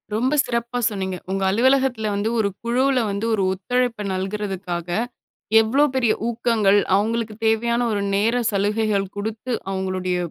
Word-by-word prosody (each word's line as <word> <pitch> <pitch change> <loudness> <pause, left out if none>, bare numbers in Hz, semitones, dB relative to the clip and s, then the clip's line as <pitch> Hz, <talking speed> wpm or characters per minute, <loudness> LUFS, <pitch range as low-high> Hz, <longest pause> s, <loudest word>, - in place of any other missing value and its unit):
ரொம்ப 255 +6 +1
சிறப்பா 235 0 -2
சொன்னீங்க. 190 -3 -3
உங்க 195 0 -1
அலுவலகத்துல 250 +1 +2
வந்து 205 +2 0
ஒரு 200 -2 +2
குழுவுல 255 +3 +2
வந்து 200 +3 -2
ஒரு 200 -3 +1
ஒத்துழைப்ப 230 +3 -1
நல்குறதுக்காக, 190 -3 -3 0.7
எவ்ளோ 255 +7 +2
பெரிய 240 -4 +3
ஊக்கங்கள், 225 -4 +2 0.2
அவுங்களுக்கு 220 +1 -1
தேவையான 235 +2 +2
ஒரு 205 -1 -1
நேர 220 +4 +2 0.2
சலுகைகள் 205 0 +1
குடுத்து 220 +4 -4 0.2
அவுங்களுடைய 185 -1 -2
215 Hz, 130 wpm, -22 LUFS, 195-235 Hz, 0.7 s, பெரிய